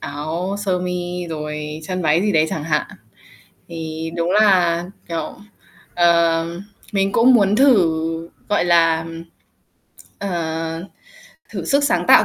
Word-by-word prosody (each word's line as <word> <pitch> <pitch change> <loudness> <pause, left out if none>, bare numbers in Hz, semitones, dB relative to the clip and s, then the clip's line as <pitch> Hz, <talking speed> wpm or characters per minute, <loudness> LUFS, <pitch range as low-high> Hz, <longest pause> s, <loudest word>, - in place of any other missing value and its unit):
áo 160 +7 -4
sơ 185 -2 +1
mi 180 -1 -4
rồi 150 -1 -5
chân 185 +2 -3
váy 155 +2 +3
gì 205 -1 +1
đấy 155 0 +3
chẳng 155 - -3
hạn. 150 -2 0 0.8
Thì 160 -1 -5
đúng 170 +1 0
là, 180 -5 +4 0.2
kiểu, 165 -1 -4 0.6
ờ, 170 -1 +3 0.5
mình 195 0 +1
cũng 250 +2 +5
muốn 205 -2 +4
thử, 165 - +2 0.2
gọi 205 - +2
là, 165 -2 +3 1.1
ờ, 165 -2 -3 0.7
thử 190 -6 -5
sức 280 +10 +2
sáng - - +1
tạo - - +8
170 Hz, 125 wpm, -20 LUFS, 160-190 Hz, 1.1 s, tạo